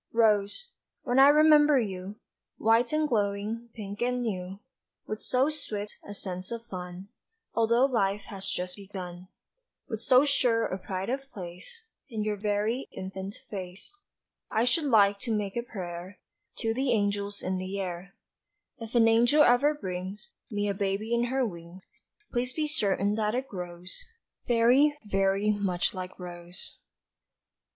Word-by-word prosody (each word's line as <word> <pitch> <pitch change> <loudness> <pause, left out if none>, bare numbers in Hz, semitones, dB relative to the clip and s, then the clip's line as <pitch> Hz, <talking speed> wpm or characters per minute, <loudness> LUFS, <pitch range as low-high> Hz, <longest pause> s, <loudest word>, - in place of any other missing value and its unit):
Rose, 220 - +2 0.3
when 250 0 +2
I 270 - +9
remember 300 -1 +6
you, 195 -2 -4 0.4
White 230 +2 +3
and 305 0 +2
glowing, 215 0 -1
pink 205 -1 -7
and 250 0 +1
new, 190 -3 -4 0.5
With 215 - -4
so 255 +2 +2
swift 210 -9 -5
a 205 - -8
sense 185 -1 -4
of 230 0 -5
fun 180 -2 -7 0.5
Altho' 235 +3 +4
life 210 -6 +1
has 195 -2 -6
just 180 +1 -3
begun; 185 -3 -8 0.6
With 220 -3 -4
so 255 +3 +5
sure 245 -5 +2
a 185 - -3
pride 190 +3 -3
of 270 +1 -3
place 190 - -9 0.2
In 220 -4 -2
your 210 0 0
very 210 +4 -1
infant 190 +2 -6 0.2
face, 190 - -7 0.6
I 220 - +2
should 250 +6 +2
like 205 -6 +5
to 230 - -3
make 200 -2 -3
a 235 - 0
prayer 185 -4 -7 0.4
To 225 0 +1
the 260 +2 0
angels 205 -1 -1
in 185 0 -1
the 190 +2 -4
air: 185 +1 -5 0.6
"If 230 +1 -8
an 230 -1 +6
angel 240 +7 +5
ever 285 +5 +4
brings 190 -2 -6 0.2
Me 205 -1 -1
a 200 - +1
baby 200 +3 -1
in 235 0 +2
her 260 +1 +1
wings, 170 -2 -9 0.5
Please 250 +1 -1
be 310 +2 0
certain 205 -8 +1
that 215 +1 +1
it 260 +2 -2
grows 180 -1 -6 0.4
Very, 250 +5 +4
very 195 +1 +2
much 195 -4 0
like 185 -1 -6
Rose." 175 -1 -6
210 Hz, 150 wpm, -28 LUFS, 190-240 Hz, 0.6 s, I